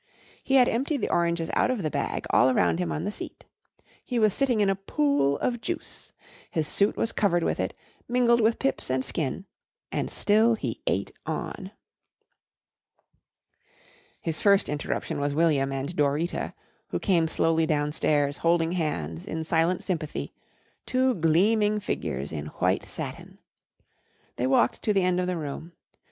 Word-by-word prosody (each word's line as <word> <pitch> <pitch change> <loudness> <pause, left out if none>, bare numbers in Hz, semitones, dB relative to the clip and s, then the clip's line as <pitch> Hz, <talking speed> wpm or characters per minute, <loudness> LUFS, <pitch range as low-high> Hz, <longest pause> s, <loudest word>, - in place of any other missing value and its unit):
He 270 - +1
had 250 -2 +6
emptied 270 +4 0
the - - -1
oranges 170 -1 +1
out - - +2
of 245 -7 -1
the 155 - -1
bag 140 - -2
all 125 - +5
around 130 +6 +2
him 180 - -1
on 155 - -2
the 205 - -2
seat. - - -8 0.6
He 250 - -3
was 215 -3 +4
sitting 260 -5 +1
in 205 - +3
a 195 - +2
pool 195 - +1
of 240 -2 -1
juice. 350 +6 -5 0.4
His 155 -2 -1
suit 200 +6 +2
was 225 - 0
covered 175 -5 +1
with - - -1
it, - - -2 0.3
mingled 240 -1 +3
with 225 +1 +3
pips 270 - -1
and 130 0 0
skin, 140 +7 -3 0.5
and - - -2
still 220 +3 +3
he - - -5
ate - - 0 0.2
on. - - -4 2.5
His 160 -2 -3
first 200 -1 +4
interruption 150 +1 -3
was 145 0 -1
William 145 -4 +2
and 135 +5 -4
Dorita, 150 +4 0 0.3
who - - -2
came 170 -5 +2
slowly 165 0 +1
downstairs 145 -1 +1
holding 165 0 +2
hands 90 - -3
in 160 0 -3
silent 165 +3 +1
sympathy, 160 -5 -3 0.5
two 255 0 +2
gleaming 210 +5 +3
figures 70 - -3
in 75 -2 -5
white - - +1
satin. - - -7 1.0
They 125 - 0
walked 125 -3 +2
to 210 - +1
the 195 -2 +2
end 180 0 +2
of 180 - 0
the 180 -1 -1
room. 160 +2 -6
170 Hz, 160 wpm, -26 LUFS, 150-215 Hz, 2.5 s, had